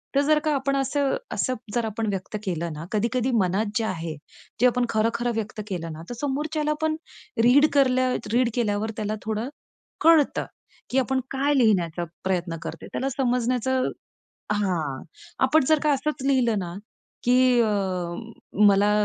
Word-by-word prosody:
तर 280 - +5
जर 300 +1 +3
का 305 - +2
आपण 275 +1 0
असं, 275 +1 +1 0.2
असं 255 - 0 0.2
जर 235 -1 +1
आपण 220 +1 -2
व्यक्त 195 +1 -4
केलं 170 -3 -2
ना, 150 +2 -7
कधी-कधी 235 +4 0
मनात 190 +3 +1
जे 225 - 0
आहे, 165 -6 -3 0.5
जे 250 - +7
आपण 245 0 +1
खरं, 220 +1 +2
खरं 240 0 -1
व्यक्त 220 -1 -3
केलं 170 -4 -4
ना, 155 - -9
तर - - -4
समोरच्याला 300 +2 -1
पण 315 0 +1 0.5
रीड 280 +5 +6
करल्या 255 -2 +3 0.2
रीड 245 0 +3
केल्यावर 215 -2 0
त्याला 215 0 -2
थोडं 220 +4 -2 0.5
कळतं, 320 -3 +4 0.4
की 260 - -1
आपण 265 +1 +1
काय 280 +2 +1
लिहिण्याचा 180 -9 +2 0.2
प्रयत्न 175 -3 -1
करतो, - - -7
त्याला 270 - -1
समजण्याचं 255 0 +1 0.6
हां, 170 -10 -1 0.4
आपण 300 0 +4
जर 310 -1 +5
का 300 - +3
असंच 275 0 -2
लिहिलं 245 -5 +3
ना, 175 -2 -5 0.5
की 250 0 +4
अ, 225 - +2 1.0
मला 200 +1 +4
240 Hz, 160 wpm, -25 LUFS, 205-270 Hz, 1.0 s, जे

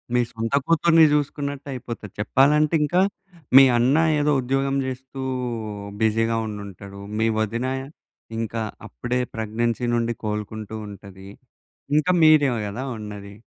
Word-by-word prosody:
మీ 125 - +4
సొంత 115 +2 -4
కూతుర్ని 165 0 +5
చూసుకున్నట్టయిపోతది. 140 -6 -3
చెప్పాలంటే 145 +8 +3
ఇంకా 175 +5 +2 0.6
మీ 135 - +11
అన్న 125 +5 +3 0.2
ఏదో 150 0 +2
ఉద్యోగం 135 +2 0
చేస్తూ 130 +1 -6 0.8
బిజీగా 115 +1 +2
ఉండుంటాడు. 100 -1 -8 0.2
మీ 110 - +2
వదిన 115 +4 -1 0.7
ఇంకా 115 0 -3 0.3
అప్పుడే 120 - -3 0.2
ప్రెగ్నెన్సీ 115 +2 -1
నుండి 115 0 0
కోలుకుంటూ 105 0 -4
ఉంటది. 95 -1 -12 0.7
ఇంకా 155 +4 +3
మీరే 155 -3 +6 0.2
కదా 105 +6 -5
ఉన్నది. 105 -2 -8
120 Hz, 110 wpm, -23 LUFS, 105-140 Hz, 0.8 s, మీ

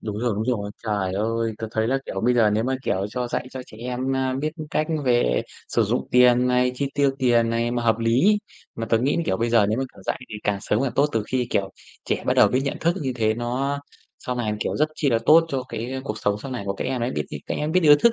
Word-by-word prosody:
đúng 105 -1 -4
rồi, 120 0 0
đúng 105 +2 -2
rồi. 110 -5 -1
Trời 100 -4 -1
ơi! 115 +2 -1
Tớ 110 - -4
thấy 110 0 0
là, 135 +2 +2
kiểu, 95 - -4
bây 125 +3 +2
giờ 115 -3 +4
nếu 110 +2 +1
mà, 130 +1 0
kiểu, 95 -6 0
cho 125 +1 -3
dạy 120 - -2
cho 130 - -6
trẻ - - -14
em, 125 +2 -2
à, 130 -1 0
biết 155 +1 -1 0.2
cách 155 - 0 0.2
về 120 - +2 0.3
sử - - +2
dụng - - -1
tiền 125 0 +5
này, 125 0 +2
chi 140 +2 -1
tiêu 140 -1 +3
tiền 120 -3 +3
này 115 +1 0
mà 120 0 -1
hợp 115 -1 +2
lý. 125 - +3 0.4
Mà 115 - -4
tớ 115 - +2
nghĩ 135 +5 +1
là, 170 - +1
kiểu, 95 - +1
bây 115 +2 -1
giờ 115 -3 +5
nếu 110 +3 0
mà, 135 - 0
kiểu, - - -14
dạy - - -3
thì - - -8
càng 100 -1 +1
sớm 105 - 0
càng 135 -3 -1
tốt, 140 - +4
từ 115 - +1
khi 125 -2 +1
kiểu 95 -1 0 0.3
trẻ - - -2
bắt - - +2
đầu - - +6
biết 130 - +1
nhận 140 - -2
thức, 170 +1 +2
như 130 -2 -1
thế 110 -2 +2
nó 125 +4 -2 0.4
sau 125 - -4
này, 110 -3 -1
kiểu, - - -1
rất 155 +1 +2
chi 145 -3 0
là 115 - +3
tốt 165 +2 +7
cho 135 -4 -2
cái, 115 +3 -5
ơ, 130 - -3
cuộc 105 -6 -4
sống 105 -1 0
sau 135 - -6
này 125 - -4
của 100 - 0
các - - -4
em 130 -1 -2
ấy. 120 - 0
Biết 75 - -2
nh - - -6
các - - -2
em 150 +1 -2
biết 185 - +4
được 160 - +3
ý - - +11
thức 235 - +6
120 Hz, 295 wpm, -23 LUFS, 110-130 Hz, 0.4 s, ý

